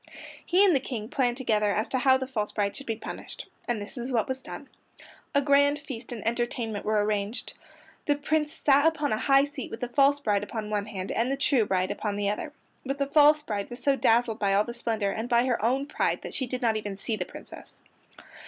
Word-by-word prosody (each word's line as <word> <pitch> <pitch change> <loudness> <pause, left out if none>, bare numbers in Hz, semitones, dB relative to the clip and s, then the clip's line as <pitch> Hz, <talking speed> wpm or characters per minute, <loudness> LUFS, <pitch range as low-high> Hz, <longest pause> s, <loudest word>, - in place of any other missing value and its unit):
He 370 +3 +4
and 365 -6 +4
the - - +4
King 230 -4 -5
planned 245 -3 0
together 215 -5 +1
as 215 +2 0
to 260 - 0
how 260 0 +5
the 260 - -3
false 220 -6 -3
bride 200 -1 -1
should 275 - -9
be 225 - -1
punished. 220 - -7 0.2
And 240 -3 0
this 205 +5 -8
is 245 +2 -4
what 230 -4 +1
was 260 0 -3
done: - - -9 0.7
A 280 - +4
grand 285 +1 +4
feast 260 -5 -8
and 230 -4 -6
entertainment 235 -2 -2
were 210 -1 +2
arranged. 210 +2 -1 0.5
The 290 - +3
Prince 300 +1 0
sat 285 -1 +3
upon 300 -5 0
a - - +1
high 275 +2 +4
seat 285 -3 -7
with 225 - -7
the 245 - -2
false 275 +3 +3
bride 205 -7 +1
upon 215 0 -5
one 205 0 -1
hand 195 -3 -5
and 235 +4 0
the 275 - -1
true 270 -6 +2
bride 185 0 0
upon 205 -2 -3
the 205 0 0
other. 250 +8 -4 0.3
But 275 +1 -3
the 280 - +1
false 300 +1 +5
bride 205 -7 -3
was 240 0 -8
so 280 0 +3
dazzled 230 -2 +2
by 195 -1 +2
all 205 - +4
the 235 - -6
splendor, 225 -4 -1
and 225 +4 -4
by 240 0 +4
her 240 -5 0
own 260 +4 +1
pride 295 - -1
that - - -7
she 260 - -2
did 250 +1 -4
not 225 -2 +2
even 205 -2 -5
see 220 +3 -2
the 190 - -2
Princess. - - -12
240 Hz, 235 wpm, -27 LUFS, 215-275 Hz, 0.7 s, how